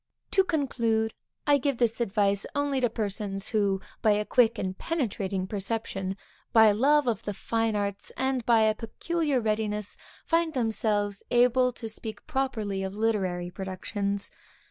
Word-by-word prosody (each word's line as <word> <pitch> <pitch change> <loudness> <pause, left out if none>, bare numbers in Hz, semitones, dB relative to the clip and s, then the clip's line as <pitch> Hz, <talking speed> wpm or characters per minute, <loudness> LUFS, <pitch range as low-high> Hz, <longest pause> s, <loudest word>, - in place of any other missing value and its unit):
To 385 - +5
conclude, 235 -10 0 0.3
I 290 -1 +5
give 275 -1 0
this 235 -1 +1
advice 200 -2 +1
only 285 -2 0
to 245 - +4
those - - -26
persons 200 -2 -2
who, 200 -3 +1 0.2
by 215 - +5
a 210 +1 0
quick 235 -1 +3
and 190 -2 -2
penetrating 200 - -2
perception, 195 -1 -3 0.3
by 220 -1 +7
a - - +4
love 285 +6 +4
of 235 -3 0
the 205 - -4
fine 225 +1 0
arts, 200 -1 -3
and 265 -1 0
by 230 -1 +4
a 220 0 +4
peculiar 290 +6 -1
readiness, 210 -2 -1 0.3
find 330 -2 +1
themselves 210 -4 0
able 250 +1 +4
to 230 - -6
speak 215 -1 -7
properly 245 -9 -1
of 190 0 -4
literary 190 -5 0
productions. 200 +2 -3
220 Hz, 155 wpm, -28 LUFS, 200-250 Hz, 0.3 s, by